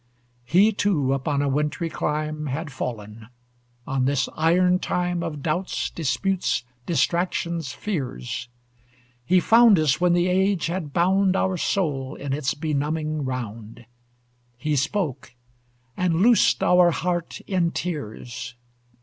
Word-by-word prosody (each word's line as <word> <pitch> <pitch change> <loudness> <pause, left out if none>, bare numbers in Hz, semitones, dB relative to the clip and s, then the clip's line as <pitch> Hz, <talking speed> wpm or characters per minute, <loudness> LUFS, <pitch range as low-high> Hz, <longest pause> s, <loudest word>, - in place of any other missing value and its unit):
He 190 - +4
too 170 -11 +1
upon 140 +1 -1
a - - 0
wintry 150 +4 -1
clime 155 -1 -3
Had 145 +3 -4
fallen 110 -4 -6 0.6
on 135 -2 0
this 135 -1 +1
iron 180 +3 +3
time 180 -1 -1
Of 155 -4 -5
doubts, 175 +4 -2
disputes, 180 0 -1 0.2
distractions, 170 -1 0
fears. 130 - -4 0.7
He 185 +9 +4
found 225 +1 +6
us 155 -1 +1
when 180 -1 +4
the 175 +1 +2
age 190 -1 +1
had 165 -3 -3
bound 190 +4 +2
Our 190 -1 +1
souls 150 -7 -1
in 140 -1 -4
its 140 -2 -1
benumbing 155 0 -2
round; 115 -2 -6 0.7
He 150 +4 -1
spoke, 145 -3 -2 0.6
and 180 -1 +1
loosed 235 0 +4
our 180 -1 +5
heart 175 0 -2
in 180 -3 0
tears. 125 -7 -5
155 Hz, 125 wpm, -24 LUFS, 135-180 Hz, 0.7 s, found